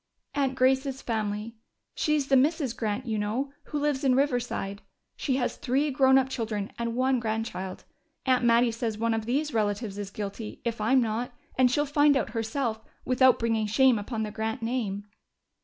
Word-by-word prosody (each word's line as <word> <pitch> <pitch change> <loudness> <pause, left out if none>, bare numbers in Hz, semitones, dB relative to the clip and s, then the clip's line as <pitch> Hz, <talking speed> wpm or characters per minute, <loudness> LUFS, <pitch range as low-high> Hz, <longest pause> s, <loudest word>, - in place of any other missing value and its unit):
"Aunt 275 -2 0
Grace's 265 +1 +2
family. 215 0 -3 0.4
She's 300 -3 0
the 270 - +5
Mrs. 280 -2 +2
Grant, 220 +3 -2
you 220 -3 -1
know, 245 +7 -2
who 300 - -4
lives 290 -2 0
in 260 -2 +4
Riverside. 245 -7 -1 0.3
She 265 - -1
has 255 -2 -1
three 280 +4 0
grown 265 -1 +5
up 265 -1 +3
children 220 -5 -3
and 235 0 -2
one 260 0 +2
grandchild. 220 -4 -3 0.4
Aunt 255 -2 +3
Mattie 235 0 +4
says 225 -1 -3
one 230 +1 +1
of 225 0 -2
these 290 +5 0
relatives 205 -1 -1
is 200 -1 -4
guilty, 210 +2 -6
if 230 -2 -2
I'm 255 +5 +4
not, 230 +2 -2 0.2
and 255 -1 +4
she'll 290 +4 +1
find 290 0 +4
out 240 - -2
herself, 225 0 -2 0.2
without 255 0 +5
bringing 225 -2 0
shame 245 +1 +4
upon 220 +2 -3
the 210 - -4
Grant 220 +3 -3
name." 225 -4 -2
235 Hz, 175 wpm, -27 LUFS, 220-265 Hz, 0.4 s, the